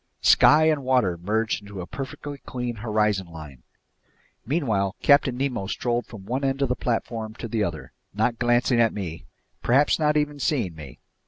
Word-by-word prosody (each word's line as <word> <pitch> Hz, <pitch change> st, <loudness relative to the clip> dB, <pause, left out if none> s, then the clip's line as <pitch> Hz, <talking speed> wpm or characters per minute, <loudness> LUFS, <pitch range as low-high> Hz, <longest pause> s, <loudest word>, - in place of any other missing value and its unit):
Sky 155 Hz, +1 st, +6 dB
and 155 Hz, -2 st, +2 dB
water 125 Hz, -9 st, +2 dB
merged 105 Hz, +6 st, -1 dB
into 100 Hz, -1 st, -9 dB
a 90 Hz, -, -5 dB
perfectly 140 Hz, +4 st, -7 dB
clean 125 Hz, -3 st, -5 dB
horizon 105 Hz, -3 st, 0 dB
line. 75 Hz, -6 st, -11 dB, 0.9 s
Meanwhile 110 Hz, -, 0 dB
Captain 140 Hz, -3 st, +4 dB
Nemo 130 Hz, -7 st, -2 dB
strolled 120 Hz, +3 st, -2 dB
from 105 Hz, -5 st, -11 dB
one 130 Hz, +6 st, -2 dB
end 135 Hz, +1 st, 0 dB
of 135 Hz, -, 0 dB
the 125 Hz, -, +1 dB
platform 115 Hz, -2 st, -3 dB
to 115 Hz, -, -6 dB
the 110 Hz, -1 st, -1 dB
other, 85 Hz, -5 st, -5 dB, 0.2 s
not 110 Hz, +3 st, 0 dB
glancing 120 Hz, 0 st, +3 dB
at 115 Hz, -, +2 dB
me, 85 Hz, -6 st, -6 dB, 0.4 s
perhaps 140 Hz, +6 st, +3 dB
not 150 Hz, -1 st, +2 dB
even 150 Hz, -1 st, -1 dB
seeing 125 Hz, -, 0 dB
me. 75 Hz, -5 st, -11 dB
115 Hz, 170 wpm, -24 LUFS, 100-135 Hz, 0.9 s, Sky